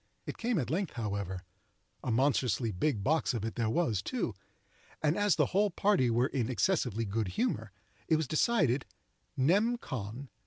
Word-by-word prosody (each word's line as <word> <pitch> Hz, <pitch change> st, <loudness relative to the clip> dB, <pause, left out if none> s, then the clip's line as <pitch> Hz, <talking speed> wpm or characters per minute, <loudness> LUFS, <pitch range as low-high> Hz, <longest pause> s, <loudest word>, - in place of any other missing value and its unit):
It -, -, -6 dB
came 235 Hz, -2 st, 0 dB
at 140 Hz, -5 st, -1 dB
length, 185 Hz, +1 st, -1 dB
however,—a 100 Hz, 0 st, -6 dB
monstrously 125 Hz, -1 st, +2 dB
big 105 Hz, +2 st, 0 dB
box 155 Hz, -1 st, +1 dB
of 110 Hz, -2 st, -2 dB
it 115 Hz, -, -3 dB
there 115 Hz, -2 st, 0 dB
was, 115 Hz, -, +1 dB
too—and 150 Hz, -, -4 dB
as 205 Hz, 0 st, +3 dB
the -, -, +3 dB
whole 205 Hz, +2 st, +4 dB
party 190 Hz, -8 st, +2 dB
were 120 Hz, +2 st, +3 dB
in 125 Hz, -3 st, -1 dB
excessively 125 Hz, -, +1 dB
good 105 Hz, +1 st, -1 dB
humor, -, -, -1 dB, 0.4 s
it 160 Hz, -, +4 dB
was 155 Hz, -2 st, 0 dB
decided, 155 Hz, -, +2 dB, 0.5 s
nem. 205 Hz, -, +3 dB
con. 125 Hz, -, -6 dB
130 Hz, 155 wpm, -31 LUFS, 110-170 Hz, 0.5 s, whole